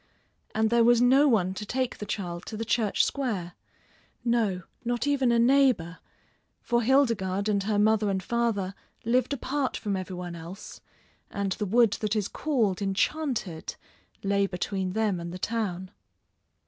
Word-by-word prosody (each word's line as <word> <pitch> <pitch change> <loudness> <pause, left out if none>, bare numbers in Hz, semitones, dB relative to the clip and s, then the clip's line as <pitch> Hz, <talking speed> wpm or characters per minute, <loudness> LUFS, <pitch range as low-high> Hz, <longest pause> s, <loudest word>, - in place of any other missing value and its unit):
And 220 0 +2
there 235 0 +5
was 240 0 +5
no 265 +4 +5
one 190 -8 +2
to 200 - -6
take 255 +4 -2
the 210 - -6
child 175 -4 -4
to 220 - -5
the 225 - -3
Church 220 -2 +2
Square. 205 -11 -3 0.7
No, 220 -6 +1 0.2
not 240 0 -1
even 275 -4 +2
a 235 - +3
neighbor, 240 -8 +3 0.6
for 235 0 0
Hildegarde 220 -6 +2
and 200 -1 +1
her 210 +1 0
mother 215 0 +3
and 190 -1 -1
father 225 -4 -1 0.3
lived 250 +4 +2
apart 280 0 -2
from 205 -3 -2
every 185 0 -5
one 175 -1 -6
else, 170 +5 -10 0.5
and 200 -1 -2
the 210 +2 -2
wood 230 +1 +4
that 215 0 0
is 210 -3 0
called 225 -11 0
Enchanted 200 - -1 0.5
lay 200 0 +2
between 185 0 -3
them 210 -4 0
and 170 0 -6
the 180 - -6
town. 190 -3 -3
215 Hz, 160 wpm, -27 LUFS, 190-240 Hz, 0.7 s, there